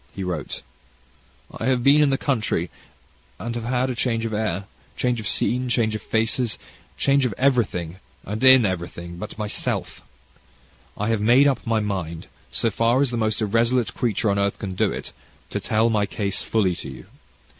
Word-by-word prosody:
He 95 Hz, -, -4 dB
wrote: 90 Hz, -1 st, -4 dB, 1.0 s
"I 115 Hz, -, -1 dB
have 130 Hz, -2 st, +2 dB
been 145 Hz, +3 st, +6 dB
in 145 Hz, -, +4 dB
the 135 Hz, -, +2 dB
country, 110 Hz, -, -1 dB, 0.7 s
and 115 Hz, +1 st, -4 dB
have 115 Hz, -1 st, -4 dB
had 125 Hz, +1 st, 0 dB
change 115 Hz, -1 st, 0 dB
of 110 Hz, -, -3 dB
air, 100 Hz, -3 st, -1 dB, 0.3 s
change 125 Hz, -2 st, 0 dB
of 105 Hz, -, -4 dB
scene, 125 Hz, +4 st, 0 dB
change 110 Hz, -2 st, +2 dB
of 110 Hz, -, -3 dB
faces, 115 Hz, +1 st, 0 dB, 0.4 s
change 140 Hz, 0 st, +3 dB
of 120 Hz, -6 st, -1 dB
everything 110 Hz, -10 st, +1 dB, 0.3 s
and 105 Hz, +5 st, -4 dB
in 130 Hz, -3 st, +8 dB
everything 85 Hz, -2 st, -4 dB
but 105 Hz, +4 st, -7 dB
myself. 105 Hz, -1 st, -2 dB, 1.0 s
I 105 Hz, +2 st, -1 dB
have 115 Hz, -2 st, +1 dB
made 125 Hz, +6 st, +6 dB
up 130 Hz, -4 st, 0 dB
my 115 Hz, -1 st, +2 dB
mind, 90 Hz, -6 st, -3 dB, 0.3 s
so 115 Hz, -, 0 dB
far 115 Hz, +5 st, +2 dB
as 135 Hz, -, -1 dB
the -, -, -2 dB
most 110 Hz, 0 st, 0 dB
irresolute 115 Hz, 0 st, +1 dB
creature 110 Hz, -3 st, 0 dB
on 100 Hz, -, 0 dB
earth 100 Hz, 0 st, 0 dB
can 95 Hz, -2 st, -5 dB
do -, -, +1 dB
it, -, -, -6 dB, 0.4 s
to -, -, -1 dB
tell 110 Hz, +2 st, +2 dB
my 105 Hz, -2 st, +1 dB
case 100 Hz, -2 st, -2 dB
fully 100 Hz, -6 st, +1 dB
to -, -, -7 dB
you. 65 Hz, -, -10 dB
110 Hz, 180 wpm, -23 LUFS, 100-125 Hz, 1.0 s, in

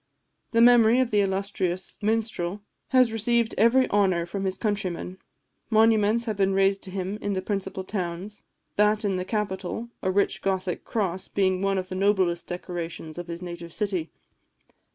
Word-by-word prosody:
The 230 Hz, -, +3 dB
memory 240 Hz, 0 st, +6 dB
of 255 Hz, -2 st, +1 dB
the 210 Hz, -1 st, +4 dB
illustrious 190 Hz, -2 st, -2 dB
Minstrel 210 Hz, -3 st, -1 dB, 0.3 s
has 255 Hz, -3 st, +4 dB
received 230 Hz, +1 st, +1 dB
every 235 Hz, +5 st, +4 dB
honour 190 Hz, -4 st, +2 dB
from 195 Hz, +3 st, -4 dB
his 190 Hz, 0 st, -1 dB
countrymen; 190 Hz, -4 st, -3 dB, 0.5 s
monuments 220 Hz, 0 st, +4 dB
have 220 Hz, -3 st, -2 dB
been 195 Hz, -1 st, +2 dB
raised 195 Hz, 0 st, +3 dB
to -, -, -8 dB
him 190 Hz, +2 st, -4 dB
in 205 Hz, -, -1 dB
the 190 Hz, -, -1 dB
principal 190 Hz, -1 st, -3 dB
towns 185 Hz, +1 st, -5 dB, 0.4 s
that 210 Hz, +1 st, +3 dB
in 195 Hz, -2 st, 0 dB
the 185 Hz, -, -3 dB
capital, 210 Hz, +2 st, -3 dB
a 190 Hz, -, 0 dB
rich 200 Hz, +2 st, +1 dB
Gothic 190 Hz, -2 st, -2 dB
cross, 190 Hz, -4 st, -2 dB
being 185 Hz, -2 st, +1 dB
one 195 Hz, 0 st, +1 dB
of 185 Hz, 0 st, -3 dB
the -, -, -5 dB
noblest 185 Hz, -3 st, +1 dB
decorations 175 Hz, -2 st, -5 dB
of 175 Hz, -, -6 dB
his 170 Hz, +1 st, -6 dB
native 170 Hz, -1 st, -7 dB
city. 190 Hz, -7 st, -1 dB
195 Hz, 165 wpm, -26 LUFS, 185-215 Hz, 0.5 s, memory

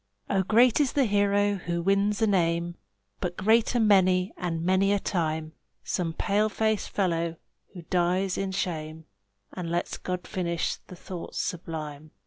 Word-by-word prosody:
Oh, 195 Hz, -, +3 dB
great 230 Hz, +6 st, +4 dB
is 285 Hz, -3 st, +2 dB
the 275 Hz, -2 st, +3 dB
hero 205 Hz, -1 st, +2 dB
who 175 Hz, -1 st, -3 dB
wins 200 Hz, +3 st, +2 dB
a -, -, +6 dB
name, 170 Hz, -3 st, +1 dB, 0.5 s
But 175 Hz, 0 st, -3 dB
greater 225 Hz, +4 st, +3 dB
many 185 Hz, -4 st, +4 dB
and 165 Hz, -3 st, -3 dB
many 190 Hz, +2 st, +3 dB
a 205 Hz, -, +3 dB
time 160 Hz, -4 st, -2 dB, 0.3 s
Some 170 Hz, -3 st, -2 dB
pale 210 Hz, +5 st, +1 dB
faced 220 Hz, 0 st, 0 dB
fellow 170 Hz, -4 st, 0 dB, 0.4 s
who 175 Hz, -, -8 dB
dies 180 Hz, +2 st, +1 dB
in 195 Hz, -1 st, -2 dB
shame, 160 Hz, -4 st, -3 dB, 0.5 s
And 180 Hz, -3 st, -5 dB
lets 175 Hz, +1 st, -2 dB
God 180 Hz, -1 st, -4 dB
finish 170 Hz, -3 st, -2 dB
the 180 Hz, -, -10 dB
thoughts 180 Hz, 0 st, -7 dB
sublime. 155 Hz, -3 st, -5 dB
185 Hz, 150 wpm, -27 LUFS, 170-200 Hz, 0.5 s, a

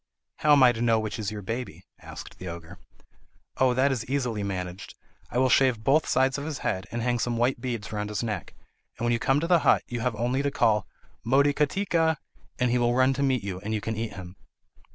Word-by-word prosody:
"How 150 Hz, -1 st, +4 dB
am 140 Hz, -2 st, +6 dB
I 125 Hz, -, +7 dB
to 115 Hz, -1 st, -5 dB
know 115 Hz, -2 st, +3 dB
which 110 Hz, +1 st, -4 dB
is 105 Hz, -3 st, -2 dB
your 105 Hz, -1 st, -7 dB
baby?" 120 Hz, +5 st, -5 dB
asked -, -, -10 dB
the 90 Hz, -, -7 dB
Ogre. 85 Hz, +1 st, -8 dB, 0.8 s
"Oh, 130 Hz, -1 st, +3 dB
that 135 Hz, +2 st, +3 dB
is 125 Hz, -4 st, -2 dB
easily 125 Hz, -5 st, -1 dB
managed. 95 Hz, -2 st, -5 dB, 0.3 s
I -, -, -3 dB
will 130 Hz, +1 st, +4 dB
shave 125 Hz, -4 st, +3 dB
both 150 Hz, +6 st, +3 dB
sides 135 Hz, +1 st, +2 dB
of 140 Hz, -, -5 dB
his 155 Hz, -3 st, -4 dB
head, 95 Hz, -1 st, -1 dB
and 115 Hz, 0 st, -3 dB
hang 120 Hz, 0 st, 0 dB
some 120 Hz, 0 st, -1 dB
white 120 Hz, +1 st, +1 dB
beads 115 Hz, -4 st, -4 dB
round 105 Hz, -1 st, -3 dB
his 105 Hz, -1 st, -3 dB
neck. 105 Hz, -6 st, -4 dB, 0.4 s
And 120 Hz, -, -3 dB
when 120 Hz, -, +2 dB
you 115 Hz, -, 0 dB
come 135 Hz, +4 st, +2 dB
to -, -, -1 dB
the 175 Hz, -1 st, +5 dB
hut -, -, +3 dB
you 120 Hz, -, -5 dB
have 115 Hz, -1 st, -1 dB
only 120 Hz, +5 st, 0 dB
to 140 Hz, -, 0 dB
call 105 Hz, -7 st, +1 dB, 0.4 s
'Motikatika!' 150 Hz, -, +2 dB, 0.4 s
and 125 Hz, -2 st, +1 dB
he 125 Hz, -, +2 dB
will 120 Hz, 0 st, +2 dB
run 130 Hz, +1 st, +4 dB
to 135 Hz, -, -3 dB
meet 130 Hz, -5 st, +1 dB
you, 95 Hz, -2 st, -4 dB
and 110 Hz, +3 st, -3 dB
you -, -, 0 dB
can 110 Hz, +2 st, -4 dB
eat 110 Hz, 0 st, -4 dB
him." 90 Hz, -1 st, -10 dB
120 Hz, 235 wpm, -26 LUFS, 105-135 Hz, 0.8 s, I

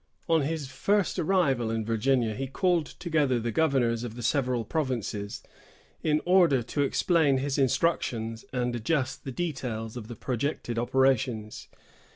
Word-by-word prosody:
On 165 Hz, -2 st, +3 dB
his 150 Hz, 0 st, -2 dB
first 200 Hz, +6 st, 0 dB
arrival 155 Hz, -10 st, +2 dB
in 110 Hz, -1 st, -2 dB
Virginia, 115 Hz, +1 st, +1 dB
he 135 Hz, +5 st, -4 dB
called 170 Hz, +2 st, +1 dB
together 150 Hz, -8 st, 0 dB
the 115 Hz, 0 st, -2 dB
governors 120 Hz, -5 st, +1 dB
of 115 Hz, -2 st, -6 dB
the 120 Hz, -, -7 dB
several 125 Hz, -3 st, +1 dB
provinces, 120 Hz, -9 st, -3 dB, 0.6 s
in 155 Hz, -1 st, +1 dB
order 175 Hz, -8 st, +4 dB
to 145 Hz, +5 st, -2 dB
explain 145 Hz, 0 st, +3 dB
his 135 Hz, +1 st, -1 dB
instructions 120 Hz, -5 st, 0 dB
and 125 Hz, -1 st, -1 dB
adjust 130 Hz, +3 st, -1 dB
the 135 Hz, -, -4 dB
details 125 Hz, -8 st, -4 dB
of 115 Hz, -3 st, -7 dB
the 120 Hz, -, -7 dB
projected 125 Hz, -2 st, -2 dB
operations. 125 Hz, -3 st, 0 dB
130 Hz, 145 wpm, -28 LUFS, 115-155 Hz, 0.6 s, order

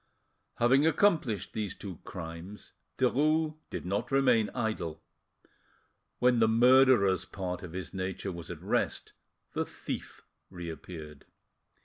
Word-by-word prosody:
Having 130 Hz, +6 st, +4 dB
accomplished 150 Hz, -, +2 dB
these 105 Hz, -4 st, -3 dB
two 95 Hz, -5 st, -8 dB
crimes, 85 Hz, +4 st, -8 dB, 0.3 s
Derues 155 Hz, +5 st, +2 dB
did -, -, -5 dB
not 100 Hz, +6 st, -1 dB
remain 125 Hz, -5 st, +3 dB
idle. 110 Hz, -10 st, -2 dB, 1.1 s
When 125 Hz, -1 st, +4 dB
the 110 Hz, -, +5 dB
murderer's 120 Hz, -4 st, +5 dB
part 90 Hz, -2 st, -5 dB
of 90 Hz, -2 st, -8 dB
his 90 Hz, -2 st, -6 dB
nature 95 Hz, +1 st, -3 dB
was 85 Hz, -2 st, -8 dB
at -, -, -7 dB
rest, -, -, -1 dB, 0.4 s
the -, -, 0 dB
thief -, -, -7 dB, 0.3 s
reappeared. 80 Hz, -4 st, -8 dB
105 Hz, 115 wpm, -30 LUFS, 90-130 Hz, 1.1 s, the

